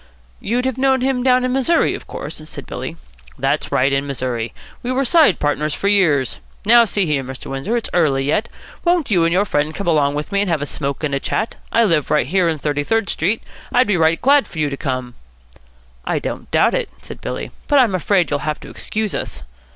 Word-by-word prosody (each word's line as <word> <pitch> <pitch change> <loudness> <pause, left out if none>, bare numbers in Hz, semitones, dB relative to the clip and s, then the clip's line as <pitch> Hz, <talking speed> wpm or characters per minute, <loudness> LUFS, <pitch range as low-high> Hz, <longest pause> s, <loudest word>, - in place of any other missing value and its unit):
"You'd 245 +4 -1
have 260 -1 -2
known 265 -1 +3
him 260 -1 +1
down 255 0 +3
in 255 - 0
Missouri, 270 +6 +2
of - - -8
course?" - - -6
said - - -7
Billy. - - -6 0.4
"That's - - -1
right. 135 +2 +2
In 135 +1 0
Missouri. 125 -4 -3 0.3
We 245 - -3
were 265 +1 +1
side 300 - +5
partners 145 +1 -1
for 200 - 0
years. 155 - +2 0.3
Now, 235 +2 +7
see 200 -3 0
here, 145 -4 0
Mr. 130 +1 -8
Windsor, 135 - -1
it's 230 - -3
early 145 -6 +2
yet. 210 +11 0 0.3
Won't 345 -7 +1
you 175 -4 +4
and 165 - +2
your 190 +4 +3
friend 150 -4 -1
come 200 - -4
along 145 -4 +2
with 150 +5 -4
me 200 0 +2
and 205 - -1
have 165 -3 +1
a 145 - -2
smoke 140 0 -3
and 145 -2 -1
a 140 - +1
chat? 220 +9 -2 0.2
I 230 - +4
live 165 -9 +1
right 150 -4 +2
here 180 +4 +2
in 160 - -1
Thirty 145 0 -1
Third 225 +5 0
Street. 200 +8 0 0.3
I'd 250 +1 +4
be 205 - +1
right 165 -1 +3
glad 280 +2 +4
for - - -12
you 150 -2 0
to - - -2
come." 130 -2 -3 0.9
"I - - -1
don't - - -5
doubt - - +3
it," - - -1
said - - -10
Billy, - - -5 0.2
"but 290 - +3
I'm 245 -7 +4
afraid 185 -1 +1
you'll 145 - +1
have 150 +1 -3
to - - -10
excuse 215 -1 -3
us." 65 -1 -4
170 Hz, 230 wpm, -19 LUFS, 145-235 Hz, 0.9 s, Now